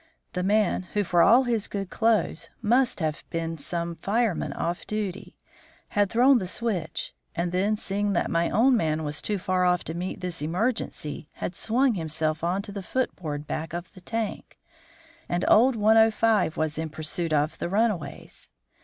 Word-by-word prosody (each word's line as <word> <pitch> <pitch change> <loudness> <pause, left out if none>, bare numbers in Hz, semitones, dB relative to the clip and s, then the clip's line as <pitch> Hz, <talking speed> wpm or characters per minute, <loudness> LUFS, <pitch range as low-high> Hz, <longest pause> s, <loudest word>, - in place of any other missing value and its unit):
The 180 - -1
man, 195 -1 +1
who 205 - +2
for 175 -2 +3
all 240 +8 +6
his 230 -4 0
good 195 -2 -5
clothes, 225 -1 +1
must 240 -1 +2
have 155 -1 -2
been 165 -1 -3
some 170 +3 -2
fireman 210 +2 0
off 175 +1 -3
duty, 205 -3 -4 0.5
had 205 -1 +2
thrown 250 +4 +5
the 185 - -3
switch, 190 -6 -2 0.2
and 170 +1 -1
then, 200 +4 +1
seeing 205 0 -1
that 175 - 0
my 170 0 +1
own 250 +4 +4
man 160 -6 0
was 150 +1 -2
too 210 - -1
far 185 0 0
off 180 -1 +2
to 160 - -5
meet 180 +2 -4
this 180 -4 -3
emergency, 165 - -2
had - - -4
swung 245 +7 +2
himself 160 -3 -2
on 180 +4 0
to 200 - -7
the 200 0 -5
foot 260 +7 -1
board 150 -4 -5
back 160 +2 -4
of 175 +1 -6
the 185 - -13
tank; 225 +3 -4 0.7
and 175 +1 0
old 245 +3 +5
105 220 -3 +3
was 155 0 -1
in 160 0 -3
pursuit 160 +2 -3
of 150 +1 +1
the - - -2
runaways. 210 -4 -2
185 Hz, 175 wpm, -26 LUFS, 165-220 Hz, 0.7 s, all